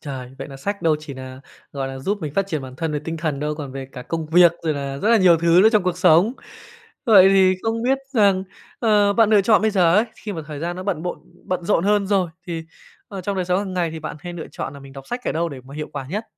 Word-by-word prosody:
Trời! 130 -4 -7
Vậy - - -6
là 135 - -9
sách 200 +8 -4
đâu 160 -3 +3
chỉ 150 -2 -9
nà, 130 0 -9 0.3
gọi 135 -1 -3
là, 135 0 -7
giúp 200 +10 -2
mình 150 -2 -5
phát 195 -1 +1
triển 155 -7 -3
bản 130 -1 -10
thân 160 +1 -2
về 150 - -1
tinh 165 0 -4
thần 155 -3 -3
đâu, 150 +1 -2
còn 145 -3 -7
về 135 -1 -6
cả 125 - -8
công 165 +4 -4
việc 170 +2 +6
rồi 160 -2 0
là 140 -1 -4
rất 210 - 0
là 230 - +6
nhiều 185 -5 +5
thứ 170 +2 +4
nữa 220 - +7
trong 215 -3 +4
cuộc 180 -1 -2
sống. 180 +4 +5 0.7
Vậy 200 -6 +7
thì 190 -1 +5
không 225 0 -1
biết 265 +2 +2 0.2
rằng, 200 -4 +3 0.3
ờ, 210 -3 +3
bạn 220 0 +3
lựa 210 -2 +6
chọn 215 +1 +4
bây 220 - +3
giờ 180 -4 +3
ấy, 215 - +4
khi 210 - -6
mà 165 -4 -5
thời 150 -2 -7
gian 175 +1 -3
nó 185 - -5
bận 185 -5 -2
bộn 180 - -4 0.3
bận 180 -1 -3
rộn 180 -2 +1
hơn 205 0 +2
rồi 190 -4 +1 0.2
thì, 165 -2 -4 0.4
ờ, 195 -2 -6
trong 195 +2 -3
đời 185 - -1
sống 180 +1 +1
hàng 195 -1 -4
ngày 175 -2 0
thì 160 - -6
bạn 155 -1 -6
hay 175 +2 -7
lựa 170 -2 -7
chọn - - -5
là 140 - -11
mình 135 0 -13
đọc 135 0 -11
sách 245 +1 -5
ở - - -1
đâu 170 +2 -1
để 140 -5 -9
mà 135 +2 -12
hiệu 150 0 -5
quả 135 -2 -5
nhất? 210 +5 -3
175 Hz, 295 wpm, -21 LUFS, 150-200 Hz, 0.7 s, nữa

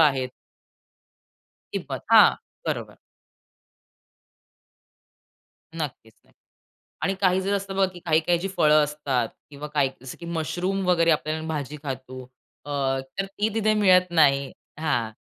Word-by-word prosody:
आहेत. 135 -5 +3 1.4
किंमत. - - -4
हां, - - +8 0.3
बरोबर. - - -3 2.8
नक्कीच 135 -8 -6
नक्की - - -30 0.7
आणि 195 - +1
काही 185 0 +3
जर 195 +2 -1
असतं 195 -1 -4
बघा 195 0 +4
की 175 - -10
काही-काही 165 +2 +2
जी 195 - -3
फळं 150 0 +5
असतात 145 -6 -1 0.2
किंवा 145 +1 -8
काही 145 -3 +1
जसं 130 - -9
की 170 - -8
मशरूम 175 +4 -2
वगैरे 170 -2 +4
आपल्याला 155 +1 -1
भाजी 150 -2 -4
खातो 130 -1 -6 0.4
अ, - - -9 0.5
तर 195 - +1
ती 200 +2 -2
तिथे 215 -1 +2
मिळत 185 -4 +4
नाही. 140 -4 +3 0.3
हां, 120 -8 0
155 Hz, 125 wpm, -25 LUFS, 140-180 Hz, 2.8 s, हां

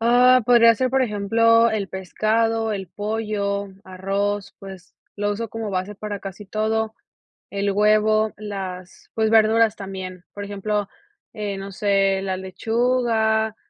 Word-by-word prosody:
Ah, 245 +2 +5
podría 230 -1 +6
ser, 255 +2 0
por 265 +1 +2
ejemplo, 230 +1 +3
el 210 -3 -2
pescado, 220 +4 0
el 195 -2 -4
pollo, 205 -1 -2 0.2
arroz, 195 +2 -3
pues, 190 -1 -11 0.2
lo 205 0 -1
uso 225 +2 -4
como 225 -1 -5
base 190 +2 -3
para 205 -1 -5
casi 195 +1 -8
todo. 220 +1 -1 0.6
El 200 0 -1
huevo, 215 +1 +3
las, 190 -3 -7
pues, 220 -1 +1
verduras 225 0 +4
también, 185 -2 -7
por 205 - -6
ejemplo, 205 0 -2 0.5
eh, 205 -3 -4
no 195 0 -7
sé, 195 -1 +1
la 190 -1 -2
lechuga, 220 +2 0
210 Hz, 135 wpm, -22 LUFS, 195-225 Hz, 0.6 s, podría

